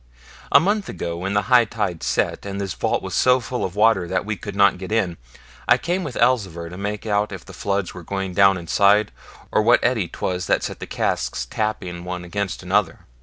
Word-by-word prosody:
A - - +8
month 200 +5 0
ago, 85 -1 -4
when 95 +4 -3
the 100 - +2
high 125 -2 +5
tide 105 -7 -3
set, - - -1
and 100 0 -5
this 95 -3 -3
vault - - -1
was - - -5
so 125 0 +4
full 125 0 -4
of 95 - -3
water 105 -4 +3
that 95 +1 -1
we 110 0 -2
could 100 -1 -8
not 100 -2 +4
get 95 +2 -7
in, 100 -6 0 0.5
I - - +6
came 180 +2 -2
with 145 -6 -6
Elzevir 95 -10 +1
to 90 - -9
make 100 +3 -4
out 105 -1 0
if 95 -3 -8
the - - -12
floods 100 -2 -2
were 90 - -9
going 95 +2 -4
down 95 +1 +5
inside, 100 +5 +3 0.4
or - - +3
what 120 +3 +5
eddy 115 -7 +1
'twas 90 +1 -3
that - - +2
set - - -5
the - - -7
casks - - -1
tapping 90 -5 -3
one 90 0 -5
against 95 +1 -3
another. 95 -2 0
100 Hz, 220 wpm, -22 LUFS, 90-110 Hz, 0.5 s, A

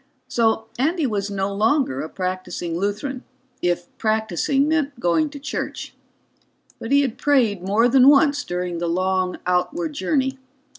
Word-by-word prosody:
So 225 -1 +1
Andy 315 +4 +1
was 205 -4 -1
no 200 0 -2
longer 220 - +1
a 155 - -5
practicing 185 -2 -4
Lutheran, 205 +8 -3 0.4
if 175 0 -2
practicing 220 - +1
meant 295 -4 0
going 240 - +1
to 290 - -9
church. 290 +2 -5 0.9
But 230 - -6
he 280 0 +5
had 260 -5 -2
prayed 240 -10 +2
more 205 +6 +3
than 260 +2 +6
once 285 0 +4
during 175 -1 -3
the 170 0 -1
long 185 +1 0
outward 295 - 0
journey. 270 -2 -1
220 Hz, 145 wpm, -22 LUFS, 185-280 Hz, 0.9 s, than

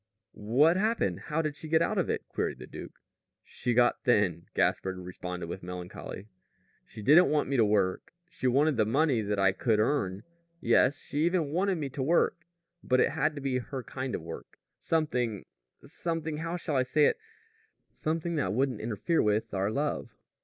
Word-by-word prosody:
"What 135 - +3
happened? 220 +4 0
How 160 +1 0
did 155 -2 -2
she 155 +2 -9
get 160 +1 +4
out - - 0
of - - 0
it?" - - -2
queried - - -2
the - - -9
duke. - - -10 0.4
"She 120 -2 -3
got 120 0 +3
thin," 95 -8 +2
Gaspard 95 -1 +1
responded 90 -1 -6
with 85 +3 -6
melancholy. 90 +2 -7 0.6
"She 105 - -10
didn't 155 - +6
want 150 -3 +1
me 140 - 0
to 115 - +5
work. 100 -3 +1 0.2
She 130 - -3
wanted 140 +2 +3
the 110 - +3
money 135 -1 +2
that 105 -1 -2
I 95 -1 +4
could 110 +2 +1
earn. 105 -5 0 0.4
Yes. 140 -4 +3
She 145 - -5
even 170 -4 +1
wanted 190 +4 +1
me 150 -3 -3
to 135 +1 -5
work. 170 +3 +1 0.4
But 130 0 +2
it - - +3
had 150 +2 0
to 145 - -6
be 135 -2 0
her 130 +1 -6
kind 130 +1 -4
of - - -6
work; 80 0 -9 0.2
something 125 - -1 0.4
something 160 -2 -3
how 165 +2 -3
shall 155 -5 -2
I - - +4
say 145 +4 +3
it? - - +2 0.7
something 165 +2 -2
that 145 - 0
wouldn't 130 -1 0
interfere 120 - 0
with 105 +1 0
our 95 +1 0
love." 145 +6 -2
130 Hz, 185 wpm, -29 LUFS, 105-155 Hz, 0.7 s, didn't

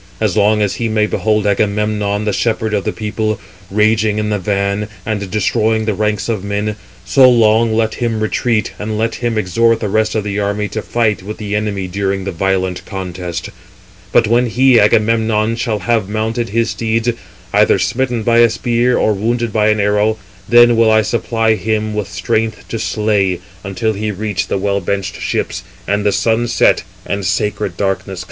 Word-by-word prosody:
As 105 -4 0
long 105 0 +3
as 100 - -1
he 115 -1 -1
may 110 -1 +2
behold 105 0 0
Agamemnon, 105 0 0
the 105 - 0
shepherd 110 -2 -1
of 100 -2 -1
the - - 0
people, 110 -1 -2 0.3
raging 105 +1 +2
in 105 0 -1
the 105 - 0
van, 100 +2 -1 0.2
[and] 105 -3 -3
destroying 110 +2 +1
the 110 - 0
ranks 105 0 -1
of 110 -5 -2
men, 105 +1 -2 0.3
so 130 +8 +6
long 115 -1 +4
let 110 0 +1
368 - - -9
him 110 -1 -2
retreat, 110 0 0
and 105 +1 -3
let 115 +1 0
him 120 -2 -1
exhort 115 +4 +2
the 105 - -2
rest 110 +2 +1
of 110 - 0
the 100 0 -3
army 100 +1 -1
to 110 - -4
fight 110 -5 0
with 105 +3 -7
the 105 -1 -4
enemy 105 -2 -2
during 95 +1 -2
the 95 - -3
violent 95 0 -1
contest. 90 -3 -5 0.6
But 115 - +4
when 120 +3 +2
he 125 +1 +4
(Agamemnon) 110 +1 +2
shall 115 -2 -1
have 105 0 0
mounted 110 +2 -2
his 115 +3 0
steeds, 115 +1 -1 0.4
either - - +4
smitten 125 -3 -1
by 115 +1 +3
a 120 0 +6
spear, 120 +2 +1
or 110 - +2
wounded 115 +2 -1
by 105 -1 +2
an 105 0 +2
arrow, 105 +2 +2 0.3
then 120 0 +6
will 115 -1 +4
I 110 0 +4
supply 115 0 0
him 110 0 -1
with 105 -2 -3
strength 110 +4 -2
to 115 - -3
slay, 105 -4 0 0.3
369 - - -27
until 110 +4 -1
he 105 +1 -3
reach 105 -1 -3
the - - -1
well 100 +1 0
benched 95 +1 -3
ships, 90 - -2 0.3
and 100 +1 0
the 105 - +2
sun 115 +3 +1
set, 120 - +3 0.2
and 100 0 -3
sacred 100 0 -1
darkness 95 -2 -1
come 95 - -6
on." 95 - -7
105 Hz, 195 wpm, -16 LUFS, 100-115 Hz, 0.6 s, so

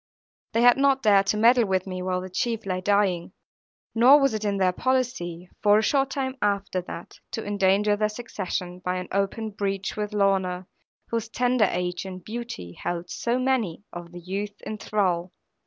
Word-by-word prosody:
They 230 +1 +3
had 245 +1 +7
not 275 -1 +3
dared 200 -3 +5
to 210 - +1
meddle 235 +1 +5
with 190 -1 0
me 185 -1 -5
while 180 0 -1
the 185 - -7
chief 230 +3 -2
lay 185 -1 -2
dying; 195 -3 +1 0.6
nor 255 +6 +7
was 275 -4 +2
it 215 -1 -3
in 200 -1 0
their 185 -1 +3
policy, 185 -7 -1
for 205 0 +5
a 215 - +2
short 270 +3 +2
time 265 -1 -3
after 200 -2 0
that, 175 -1 -9
to 225 - -3
endanger 205 +1 +2
their 210 0 +1
succession 190 -5 -5
by 180 0 -2
an 180 0 -5
open 200 +3 -1
breach 195 -1 -3
with 210 0 -3
Lorna, 190 -3 +1 0.4
whose 230 -1 -2
tender 245 -1 +2
age 180 +1 -2
and 185 -2 -8
beauty 230 - -6
held 175 - -4
so 240 +1 -1
many 255 -9 0
of 175 -1 -8
the 175 - -9
youths 200 +4 -5
in 215 -1 -6
thrall. 185 -4 0
205 Hz, 185 wpm, -25 LUFS, 185-230 Hz, 0.6 s, had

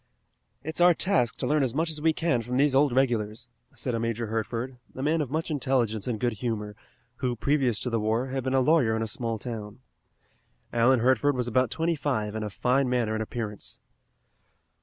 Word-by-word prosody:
"It's 160 +3 -4
our 175 -1 +7
task 165 -12 +1
to - - -2
learn 150 0 +2
as 130 -2 0
much 160 +2 +1
as 155 -1 -4
we 160 +1 +4
can 155 -6 0
from 125 +2 -3
these 140 0 +3
old 140 +1 +4
regulars," 115 -4 0 0.3
said 125 - -3
a 115 - 0
Major 115 0 -1
Hertford, 115 +3 -3 0.2
a 130 - -4
man 155 +2 +2
of 145 - -3
much 160 +3 -2
intelligence 125 -7 0
and 115 -4 -2
good 120 0 0
humor, 105 -1 -3 0.4
who, 125 -2 -1
previous 130 -3 +1
to 125 - -2
the 115 - +1
war, 110 +4 0
had 135 0 -2
been 130 +1 0
a 130 - +4
lawyer 130 -6 +3
in 110 - -1
a - - -3
small 115 +1 -2
town. 110 0 -7 0.9
Alan 120 +1 +4
Hertford 130 +3 +3
was 125 -1 -1
about 130 +1 +2
twenty 165 +5 0
five 125 -8 -1
and 110 0 -3
of 105 - -4
fine 130 +5 +1
manner 120 -3 +1
and 110 - -1
appearance. 110 -2 -5
125 Hz, 205 wpm, -27 LUFS, 110-140 Hz, 0.9 s, our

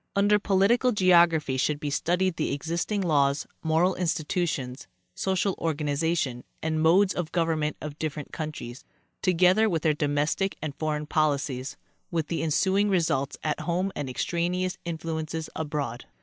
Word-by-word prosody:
Under 205 +1 +4
political 210 +6 +3
geography 170 - +4
should 145 +2 0
be 145 -1 -3
studied 175 +4 +1
the - - -1
existing 170 +8 -2
laws, 145 -5 +2 0.2
moral 165 +3 +2
institutions, 160 -6 -2 0.3
social 190 +1 0
organization 150 -4 -1 0.2
and 160 0 -1
modes 185 +4 +4
of 175 -3 -3
government 160 -3 0
of 150 0 -7
different 150 -2 -4
countries, 150 -6 -6 0.4
together 185 +4 +4
with 165 -5 -1
their 155 - +3
domestic 150 +5 0
and 155 -2 -4
foreign 150 0 -2
policies, 145 -4 -1 0.3
with 165 -3 -2
the 170 - -1
ensu 190 +5 +2
ing 205 0 +3
results 160 -7 0
at 155 -1 -1
home 180 +3 -1
and 145 -3 -3
extraneous 180 +6 -1
influences 160 -1 -4
abroad. 145 -6 -3
160 Hz, 140 wpm, -27 LUFS, 150-180 Hz, 0.4 s, Under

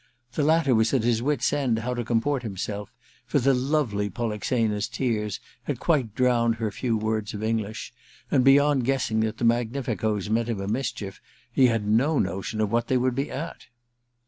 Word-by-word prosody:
The 150 - 0
ktter 155 -3 +3
was 110 +3 +3
at 125 - +1
his 115 -1 +2
wit's 140 -1 +1
end 135 -6 +1
how 120 +3 -2
to 120 -1 -2
comport 120 +4 0
himself, 105 -1 -5 0.4
for 120 - +1
the 135 0 +3
lovely 125 -6 0
Polixena*s 110 0 -1
tears 105 -5 -2 0.3
had 140 -5 -3
quite 130 - +1
drowned 120 -2 +3
her 110 -2 -2
few 115 +1 -1
words 110 0 -2
of 105 - -5
English, 110 0 -2 0.4
and 130 -3 +4
beyond 140 0 +5
guessing 120 -4 0
that 110 -1 -1
the 120 - -1
magnificoes 115 -3 0
meant 115 +2 0
him 110 -4 -2
a 95 - -4
mischief 105 -4 -3 0.3
he 130 - +5
had 115 -3 0
no 130 +9 +3
notion 105 +3 -1
what 115 +2 0
they 130 - +2
would 125 0 +1
be 135 +3 -2
at. 165 +5 -6
115 Hz, 180 wpm, -25 LUFS, 110-130 Hz, 0.4 s, beyond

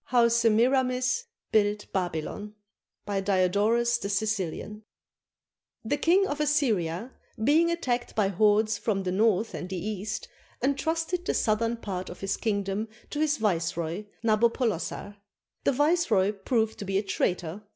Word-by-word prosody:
HOW 240 -2 +4
SEMIRAMIS 250 - +2 0.3
BUILT 210 -1 +1
BABYLON 185 +3 -3 0.5
BY 200 -1 -1
DIODORUS 205 +5 +2
THE 200 - -4
SICILIAN 210 0 -2 1.0
[The 290 +6 0
King 355 +6 +4
of 295 -5 -3
Assyria, 235 - 0 0.3
being 315 +7 +4
attacked 250 -8 -2
by 205 -3 +2
hordes 210 +2 +3
from 205 -2 -1
the 185 - -1
north 215 +2 +2
and 180 - -5
the 190 - -3
east, 200 +2 -4 0.4
entrusted 325 +6 0
the - - -1
southern 230 +2 +1
part 190 -5 -5
of 175 - -10
his 195 0 -1
king 205 -3 -1
dom 195 +3 -3 0.2
to 295 - -3
his 305 -1 +2
viceroy, 170 -2 -1 0.2
Nabopolassar. 215 -3 0 0.5
The - - +4
viceroy 275 - +2
proved 220 +2 -1
to 200 - -5
be 195 0 0
a 200 - +1
traitor. 180 -1 -1
215 Hz, 140 wpm, -27 LUFS, 195-250 Hz, 1.0 s, HOW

